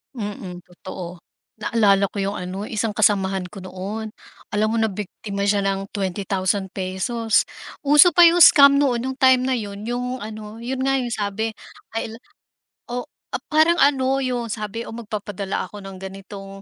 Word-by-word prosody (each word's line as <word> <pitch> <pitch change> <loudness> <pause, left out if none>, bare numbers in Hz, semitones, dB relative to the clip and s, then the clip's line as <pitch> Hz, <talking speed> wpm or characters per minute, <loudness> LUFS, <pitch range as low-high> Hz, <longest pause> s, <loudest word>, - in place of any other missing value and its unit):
Mm, 195 -5 -6
totoo 180 -1 -9 0.4
naalala 205 -3 +3
ko 200 - -2
yung 200 +1 -2
ano 185 +3 -5
isang 220 -1 -1
kasamahan 195 -3 +2
ko 200 - -12
noon, 195 +4 -6 0.4
alam 215 +1 +2
mo 230 - 0
na 225 - +3
biktima 200 0 -5
siya 200 0 +2
ng 195 0 -1
₱20,000, 195 +3 -1 0.3
uso 295 +4 +6
pa 350 - +6
'yong 340 0 +7
scam 280 -4 +8
noon, 255 -5 +2
nung 260 +1 -4
time 260 -1 +5
na 260 -1 0
yun, 205 -2 -6
yung 245 +2 -3
ano 215 +1 -8
yun 260 +2 -2
nga 270 -1 +2
yung 240 - -3
sabi, 215 +1 -2 0.5
ay 225 0 -3
la - - -9 0.8
o 245 - -3 0.3
ah, - - -2
parang 315 +2 +4
ano, 270 -1 +3
'yon 245 -3 -2
sabi, 215 +1 -5
"Oh, - - -8
magpapadala 205 -3 -4
ako 205 -1 -10
ng 195 -1 -9
ganitong 195 0 -9
210 Hz, 165 wpm, -22 LUFS, 195-245 Hz, 0.8 s, scam